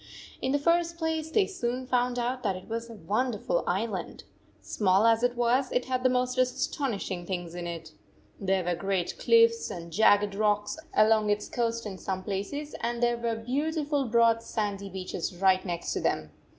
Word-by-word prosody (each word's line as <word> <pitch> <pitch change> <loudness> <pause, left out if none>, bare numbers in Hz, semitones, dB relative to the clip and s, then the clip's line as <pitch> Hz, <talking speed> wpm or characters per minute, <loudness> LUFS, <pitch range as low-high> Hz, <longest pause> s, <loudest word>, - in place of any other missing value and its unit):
In 260 - 0
the 285 - +3
first 335 +3 +1
place, 320 -1 -2
they 395 +5 +3
soon 255 -9 -3
found 250 -1 +1
out 250 +1 -1
that 200 -5 0
it 185 - -10
was 230 +1 -4
a 230 - -9
wonderful 210 +1 -1
island. 190 0 -2 0.4
Small 185 - +2
as 225 0 +4
it 245 0 +1
was, 245 +2 +1
it 250 - 0
had 255 -1 -1
the 255 - +4
most 250 0 0
astonishing 250 -7 -1
things 175 -3 -4
in 175 0 -5
it 165 -2 -6 0.5
There 190 -1 +1
were 175 0 0
great 185 0 -2
cliffs 230 -1 +4
and 170 -1 -7
jagged 205 +1 +4
rocks 210 +5 0 0.2
along 215 0 +4
its 205 0 0
coast 230 -1 -1
in 195 -3 -6
some 190 -1 -3
places, 210 +11 -4
and 235 0 -2
there 240 0 +3
were 235 -1 -1
beautiful 285 +4 -1
broad 230 -1 +3
sandy 205 -3 -3
beaches 185 -1 -4
right 190 0 +3
next 175 -2 -3
to - - -1
them. 75 -1 -1
230 Hz, 180 wpm, -28 LUFS, 195-250 Hz, 0.5 s, as